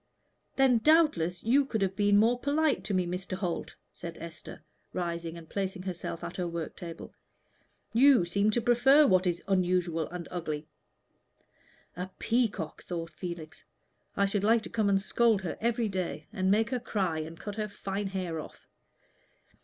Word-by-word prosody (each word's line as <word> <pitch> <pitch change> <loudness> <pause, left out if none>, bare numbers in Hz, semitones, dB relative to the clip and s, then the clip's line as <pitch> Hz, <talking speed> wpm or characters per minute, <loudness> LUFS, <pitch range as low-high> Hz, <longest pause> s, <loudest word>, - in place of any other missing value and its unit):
"Then, 265 -3 +4
doubtless, 220 - +3
you 265 +6 +4
could 220 -6 -1
have 190 0 -1
been 205 0 +4
more 235 +4 +4
polite 295 +3 +1
to 205 - -1
me, 185 -1 +2
Mr. 180 +2 -4
Holt," 180 -3 -3 0.2
said 170 -1 -8
Esther, 165 0 -9 0.3
rising 170 -2 -3
and 165 -1 -11
placing 190 -1 -3
herself 175 -2 -5
at 170 0 -6
her 180 -2 -1
work 170 -2 -5
table. 170 -2 -8 0.8
"You 255 -4 +6
seem 200 +4 +2
to 235 +3 +1
prefer 245 +5 +6
what 185 -5 +3
is 175 -1 -1
unusual 180 -4 +1
and 175 -1 -6
ugly." 155 -4 -4 1.3
"A 180 +3 -4
peacock!" 220 -9 -1
thought 170 -1 -5
Felix. 160 -1 -7 0.5
"I 200 - +4
should 200 0 -1
like 225 +1 +4
to - - -8
come 215 -3 +1
and 195 -1 +4
scold 215 0 +2
her 175 - -3
every 235 0 +1
day, 185 -6 -3
and 190 -3 0
make 215 +3 +2
her 255 - 0
cry 190 -8 -1
and 160 +1 -7
cut 205 0 -6
her 215 -1 -1
fine 200 0 -4
hair 185 -4 -3
off." - - -11
190 Hz, 170 wpm, -29 LUFS, 170-225 Hz, 1.3 s, You